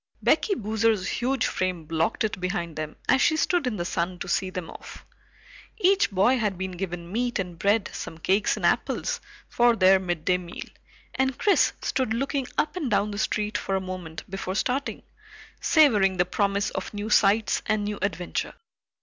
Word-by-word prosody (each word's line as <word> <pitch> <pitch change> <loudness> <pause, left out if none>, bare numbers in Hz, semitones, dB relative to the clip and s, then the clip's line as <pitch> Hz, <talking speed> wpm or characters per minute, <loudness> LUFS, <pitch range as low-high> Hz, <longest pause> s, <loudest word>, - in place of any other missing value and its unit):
Becky 400 - +2
Boozer's 220 - 0
huge 260 +2 0
frame 185 -3 -2
blocked 165 +8 0
it 215 -3 -2
behind 175 -3 -3
them 155 0 -5
as 265 - +4
she 315 - +3
stood 345 -3 +1
in 240 - -1
the 175 - -3
sun 180 0 -2
to - - -6
see 190 - 0
them 185 -2 -5
off. - - -11 0.7
Each 390 0 +3
boy 215 +7 +3
had 210 -5 -1
been 190 0 -3
given 175 -1 -5
meat 240 +3 -1
and 180 -4 -5
bread, 205 +1 +2
some 160 - -6
cakes 195 +5 +1
and - - -2
apples, - - 0 0.3
for 240 -1 +3
their 190 -2 +5
midday 180 0 0
meal, 175 -1 -8 0.5
and 265 -1 0
Chris 405 - +3
stood 255 -4 0
looking 275 +1 -1
up 300 - 0
and 310 -8 -2
down 210 0 +1
the 205 - -5
street 210 0 -1
for 195 - -2
a - - +1
moment 185 -4 -7
before 190 0 -4
starting, 260 +6 -1 0.6
savoring 210 - +4
the 180 - +3
promise 200 +2 0
of 190 - -5
new 205 +1 -4
sights 210 +2 +3
and 215 -1 +1
new 205 0 -3
adventure. 180 -3 -2
200 Hz, 180 wpm, -26 LUFS, 185-235 Hz, 0.7 s, their